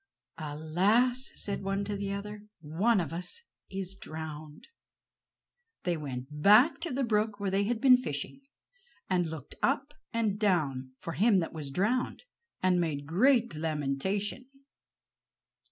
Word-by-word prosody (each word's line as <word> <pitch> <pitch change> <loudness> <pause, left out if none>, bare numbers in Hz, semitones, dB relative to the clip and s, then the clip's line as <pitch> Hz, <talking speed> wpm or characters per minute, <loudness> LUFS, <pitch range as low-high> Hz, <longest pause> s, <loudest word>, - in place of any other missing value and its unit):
"Alas!" 190 - +1
said 200 - -3
one 195 +1 -1
to 205 - -3
another, 205 +1 -5
"one 185 +9 +2
of 165 -3 -3
us 180 - -2 0.3
is 190 -1 -4
drowned." 155 -4 -8 1.2
They 175 -1 +1
went 145 -1 -6
back 215 - +6
to 335 -1 -4
the 270 +2 0
brook 215 -2 +1
where 200 -1 -1
they 200 +1 +2
had 230 +1 0
been 255 -1 +7
fishing, 200 - -4 0.7
and 175 -3 +2
looked 155 -4 -8
up 275 +2 +1 0.2
and 220 -3 0
down 140 - +1
for 165 - -6
him 210 +2 +4
that 170 -3 -1
was 150 -3 -6
drowned, 215 - 0 0.4
and 180 -1 +4
made 145 -4 -2
great 235 - +3
lamentation. 160 - -2
195 Hz, 135 wpm, -30 LUFS, 155-220 Hz, 1.2 s, been